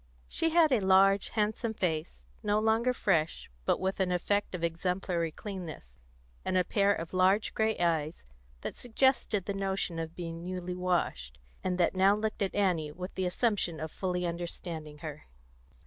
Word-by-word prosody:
She 325 - 0
had 325 -2 +5
a 250 - +4
large, 195 +1 +4
handsome 220 +1 -1
face, 155 - -2 0.2
no 205 0 +1
longer 220 +3 +3
fresh, 165 - 0
but - - +2
with 190 +1 -1
an 185 -1 +1
effect 195 +2 0
of 170 - -5
exemplary 170 0 -1
cleanness, 165 - -7 0.5
and 185 - 0
a 180 - +4
pair 200 +2 +2
of 165 -4 -3
large 190 +3 +3
grey 220 0 +1
eyes 165 -2 0 0.4
that - - -5
suggested 240 -5 +1
the 200 - -2
notion 195 -3 -1
of 165 0 -5
being 165 -1 -5
newly 180 0 -4
washed, 175 - -1 0.3
and 180 -1 0
that 175 - +3
now 190 +2 +5
looked 215 0 -3
at 195 - 0
Annie 175 -7 +1
with 180 +5 -7
the 185 -1 -1
assumption 185 -4 0
of 160 0 -4
fully 180 -1 -2
understanding 170 -3 -5
her. 150 -1 -7
185 Hz, 165 wpm, -30 LUFS, 170-205 Hz, 0.5 s, had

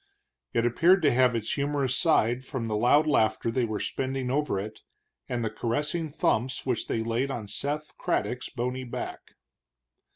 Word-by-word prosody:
It 115 - +3
appeared 170 +10 +4
to 145 - +5
have 125 -1 +4
its 110 -2 -2
humorous 140 -2 0
side 130 -6 +2
from 130 -3 -4
the 110 -1 -1
loud 125 +8 +4
laughter 110 -5 +2
they 125 +1 +1
were 110 -2 -3
spending 130 -1 -2
over 145 -7 0
it, 105 +2 -7 0.5
and 120 -2 -1
the 110 - -2
caressing 150 +9 -2
thumps 125 -3 0
which 125 -4 -1
they 110 - -1
laid 115 +4 0
on 115 -6 -4
Seth 150 +7 -3
Craddock's 125 0 -1
bony 125 +1 -3
back. 120 - -7
125 Hz, 165 wpm, -27 LUFS, 115-140 Hz, 0.5 s, to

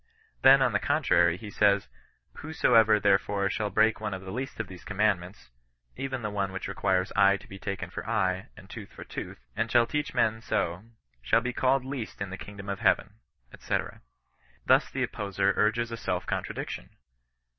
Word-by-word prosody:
Then 135 0 +7
on 125 -4 +1
the 105 - +2
contrary 90 - +2
he 105 +1 -9
says, 100 -1 +3 0.3
" - - -44
Whosoever, 115 -8 +4
therefore, 100 0 +2
shall 105 0 -1
break 110 +1 +3
one 105 -3 -2
of 95 - -9
the 95 - -7
least 130 +4 -5
of 115 - -1
these 90 -1 -11
commandments 100 -7 -1 0.4
(even 130 -2 -4
the 105 - -2
one 100 -2 -1
which 95 - -5
requires 95 -1 0
eye 100 0 +5
to - - -16
he 95 - -11
taken 95 -3 -5
for - - -6
eye, 95 -4 0
and - - -13
tooth - - -9
for - - -10
tooth), 60 - -8
and 115 0 -1
shall 120 -1 +5
teach 150 +3 -3
men 110 0 +2
so, 85 -3 -1 0.4
shall 90 - +3
be 125 +1 -3
called 130 +1 +2
least 130 -4 -5
in 100 -1 -4
the - - -4
kingdom 100 -1 -9
of 100 -1 -3
heaven," - - +1 0.4
&c. - - -1 0.9
Thus - - +4
the - - -2
opposer 100 -1 0
urges 115 +2 +1
a 115 - -4
self 115 - -2
contradic - - -3
tion. - - -7
105 Hz, 190 wpm, -28 LUFS, 95-115 Hz, 0.9 s, Then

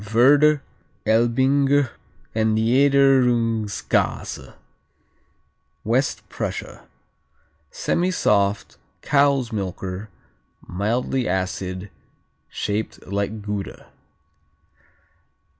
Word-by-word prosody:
Werder, 145 +4 +5 0.4
Elbinger 130 +4 +2 0.4
and 110 0 +1
Niederungskäse 120 -3 +1 1.3
West 125 +5 0
Prussia - - -6 0.8
Semisoft 105 - 0 0.3
cow's 140 -4 +2
milker, 95 0 -5 0.6
mildly 120 +6 -1
acid, 95 0 -3 0.6
shaped 105 +2 -4
like 100 +2 -3
Gouda. 105 -1 -6
115 Hz, 55 wpm, -22 LUFS, 100-135 Hz, 1.3 s, Werder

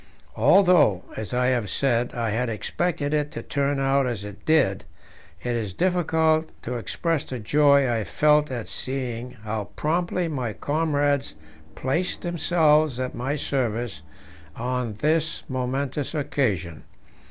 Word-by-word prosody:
Although, 145 - +5
as 110 - -5
I 125 0 +2
have 120 -6 0
said, 120 +2 0
I 115 -2 -1
had 120 +3 0
expected 145 - -2
it 150 -1 +1
to - - -5
turn 140 0 0
out 135 0 +2
as 115 -5 -3
it 105 -1 -10
did, 135 - +3 0.6
it 120 -1 -1
is 105 -5 -3
difficult 160 - +2
to 125 +1 -3
express 160 +6 -1
the 130 - -6
joy 140 +4 +4
I 115 -3 0
felt 150 +5 +3
at 120 -4 -4
seeing 125 -2 -4
how 110 -1 -3
promptly 175 +2 0
my 130 -8 -3
comrades 145 +1 0 0.4
placed 165 +8 -1
themselves 155 -5 +2
at 130 0 -2
my 135 +4 -2
service 120 - -2 0.5
on 125 -1 -2
this 155 +7 0
momentous 135 +2 -2
occasion. 100 - -1
135 Hz, 135 wpm, -25 LUFS, 120-150 Hz, 0.6 s, Although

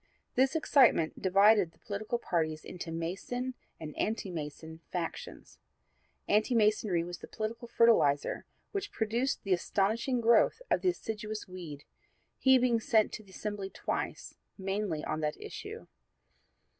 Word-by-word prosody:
This 265 +4 +3
excitement 260 - +4
divided 195 -1 +5
the - - -26
political 215 +3 -3
parties 155 -7 -1
into 175 -2 -6
Mason 195 +10 -3 0.3
and 155 -1 -7
Anti 215 -3 -1
Mason 160 0 -6
factions. 170 -2 -5 0.7
Anti 215 +4 +3
Masonry 210 -5 +3
was 175 +1 -7
the - - -10
political 225 +2 -4
fertilizer 220 -13 +3 0.2
which 405 0 -3
produced 235 +5 -1
the 195 - +2
astonishing 220 +8 +1
growth 235 - +4
of - - +3
the 370 - +3
assiduous 215 - -4
Weed, 170 -6 -8 0.6
he 265 -1 +6
being 245 -2 +3
sent 220 -3 +3
to 215 - -6
the 200 - -21
Assembly 200 0 -4
twice, - - -4 0.2
mainly 195 -5 -2
on - - -2
that 150 -1 -2
issue. - - -8
210 Hz, 135 wpm, -31 LUFS, 175-235 Hz, 0.7 s, he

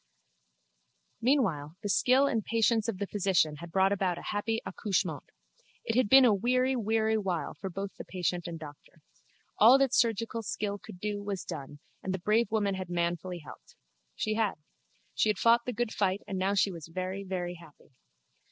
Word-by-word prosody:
Meanwhile 190 - +1
the 205 - -2
skill 255 +8 +4
and 225 -6 0
patience 225 0 +2
of 225 -5 -2
the 200 - -2
physician 185 -7 +1
had 170 +2 -9
brought 190 +2 +3
about 190 -3 0
a - - -8
happy 220 +2 -1
accouchement. 205 -4 -2 0.6
It 225 - -2
had 250 -4 +3
been 265 +2 +8
a 230 - +5
weary 255 +5 +1
weary 220 -1 +1
while 185 -5 -2
both 195 +1 -4
for - - -8
patient 180 -1 -2
and 170 -1 -5
doctor. 150 -2 -13 0.6
All 235 +5 +8
that 270 -2 +1
surgical 230 0 +1
skill 205 -1 -3
could 180 - -12
do 205 +1 -3
was 200 -2 -4
done 140 +1 -7 0.2
and 190 0 -2
the - - -3
brave 215 +6 +1
woman 205 -3 +1
had 185 -2 -5
manfully 175 0 -2
helped. - - -13 0.4
She 215 - -1
had. 220 -2 0 0.6
She 220 - +2
had 210 - +1
fought 235 +2 +4
the - - 0
good 240 0 -2
fight 195 -1 0
and 190 - -3
now 195 +2 +1
she 195 +1 +3
was 165 -3 -9
very 185 +3 -4
very 180 -2 -3
happy. 155 -3 -18
200 Hz, 180 wpm, -30 LUFS, 180-225 Hz, 0.6 s, been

